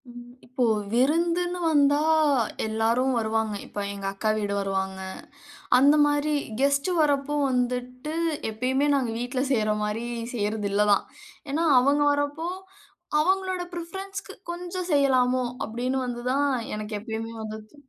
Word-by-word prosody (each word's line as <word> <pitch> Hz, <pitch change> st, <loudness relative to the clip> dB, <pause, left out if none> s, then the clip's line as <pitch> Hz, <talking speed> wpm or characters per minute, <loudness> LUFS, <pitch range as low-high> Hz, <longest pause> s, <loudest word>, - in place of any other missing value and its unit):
ம், 240 Hz, 0 st, -11 dB, 0.2 s
இப்போ 255 Hz, +1 st, -2 dB, 0.3 s
விருந்துன்னு 335 Hz, +8 st, +1 dB
வந்தா 290 Hz, -1 st, +4 dB, 0.7 s
எல்லாரும் 225 Hz, +4 st, +1 dB
வருவாங்க, 220 Hz, -1 st, 0 dB
இப்ப -, -, -7 dB
எங்க 200 Hz, -1 st, -7 dB
அக்கா 215 Hz, +2 st, -1 dB
வீடு 205 Hz, -1 st, -1 dB
வருவாங்க. 190 Hz, -1 st, -2 dB, 0.8 s
அந்த 285 Hz, +3 st, +6 dB
மாரி 290 Hz, +1 st, +1 dB, 0.3 s
கெஸ்ட் 280 Hz, +4 st, +2 dB
வர்றப்போ 290 Hz, -1 st, +1 dB
வந்துட்டு, 250 Hz, +3 st, -2 dB, 0.4 s
எப்பயுமே 260 Hz, +6 st, 0 dB
நாங்க 260 Hz, -4 st, +1 dB
வீட்ல 245 Hz, +2 st, -2 dB
செய்ற 215 Hz, -4 st, +2 dB
மாரி 210 Hz, +2 st, -2 dB, 0.3 s
செய்யறது 210 Hz, -2 st, -1 dB
இல்லதான். 205 Hz, 0 st, +3 dB, 0.5 s
ஏன்னா 325 Hz, +4 st, +1 dB, 0.2 s
அவங்க 285 Hz, +3 st, +3 dB
வர்றப்போ 290 Hz, +3 st, -1 dB, 0.7 s
அவுங்களோட 375 Hz, +2 st, +1 dB
பிரிஃபரன்ஸ்க்கு 385 Hz, +3 st, -6 dB, 0.2 s
கொஞ்சம் 355 Hz, +1 st, -5 dB
செய்யலாமோ, 255 Hz, -3 st, +3 dB, 0.2 s
அப்டின்னு 255 Hz, +4 st, -2 dB
வந்துதான் 250 Hz, +4 st, 0 dB, 0.3 s
எனக்கு 210 Hz, 0 st, -4 dB
எப்பயுமே 225 Hz, +1 st, -5 dB
வந்தது. 215 Hz, +2 st, -8 dB
255 Hz, 115 wpm, -26 LUFS, 220-295 Hz, 0.8 s, அந்த